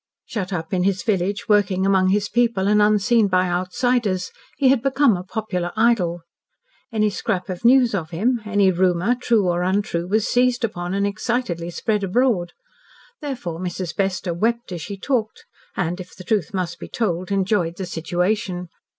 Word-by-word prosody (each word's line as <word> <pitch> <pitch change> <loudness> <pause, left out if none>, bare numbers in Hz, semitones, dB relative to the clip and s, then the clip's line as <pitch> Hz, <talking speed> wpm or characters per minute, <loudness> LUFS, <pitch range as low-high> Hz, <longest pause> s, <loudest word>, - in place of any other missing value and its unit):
Shut 195 -4 -4
up 165 -1 -4
in 180 - +1
his 190 0 0
village 200 +1 -1
working 200 -3 +2
among 190 -1 +3
his 205 +1 +1
people 235 -5 +1
and 210 0 +4
unseen 210 +1 +3
by 185 -1 +2
outsiders, 185 +2 0 0.3
he 270 - +4
had 265 -3 +3
become 270 -3 +3
a 180 - -4
popular 180 -3 -3
idol. 210 -7 +2 0.7
Any 215 -2 +1
scrap 185 -1 -2
of 180 +2 -5
news 245 -1 +5
of 165 -5 -2
him 225 +8 0
any 205 -3 +3
rumour, 180 +4 +2
true 235 -5 +1
or 175 0 +1
untrue, 180 -2 -1
was 215 +4 +1
seized 250 0 +2
upon 180 -4 -2
and 200 0 +1
excitedly 205 -5 -2
spread 210 +4 -1
abroad. 195 -4 +1 0.7
Therefore 245 - -5
Mrs. 180 -1 -4
Bester 190 -2 -1
wept 235 +5 -1
as 175 -2 -5
she 200 +5 -6
talked, 225 0 -2 0.3
and, 180 0 -1
if 180 - -12
the 185 - -10
truth 200 -3 0
must 180 -3 -3
be - - -7
told, 185 -4 -2
enjoyed 190 -3 0
the 190 - -4
situation. 180 +2 -2
195 Hz, 170 wpm, -22 LUFS, 180-225 Hz, 0.7 s, news